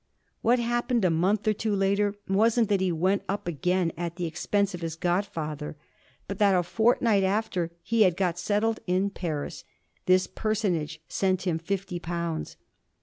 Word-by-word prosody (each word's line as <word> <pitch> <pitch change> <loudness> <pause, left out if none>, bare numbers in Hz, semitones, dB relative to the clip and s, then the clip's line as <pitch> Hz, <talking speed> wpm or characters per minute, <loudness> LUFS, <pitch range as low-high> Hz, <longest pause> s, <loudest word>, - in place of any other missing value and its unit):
What 240 +2 +4
happened 240 -1 0
a 180 - +3
month 190 +6 +1
or 215 - +4
two 215 0 -1
later 200 +1 +1
wasn't 220 +3 +3
that 200 -2 +2
he 185 -1 +1
went 185 +4 +1
up 200 -2 -2
again 175 +2 0
at 170 -1 -4
the 175 -1 -3
expense 195 +4 0
of 180 - -6
his 165 -1 -3
godfather, 165 -5 -2 0.5
but 195 - -5
that 200 -2 +5
a 180 - +3
fortnight 220 +2 +2
after 190 -3 0
he 230 0 +1
had 185 -4 +4
got 175 -3 0
settled 210 +5 0
in 185 +2 +1
Paris 155 -7 -4 0.4
this 185 0 +5
personage 180 -8 -2
sent 185 -1 0
him 170 -3 0
fifty 185 +1 -3
pounds. 170 -1 -4
190 Hz, 165 wpm, -27 LUFS, 170-205 Hz, 0.5 s, that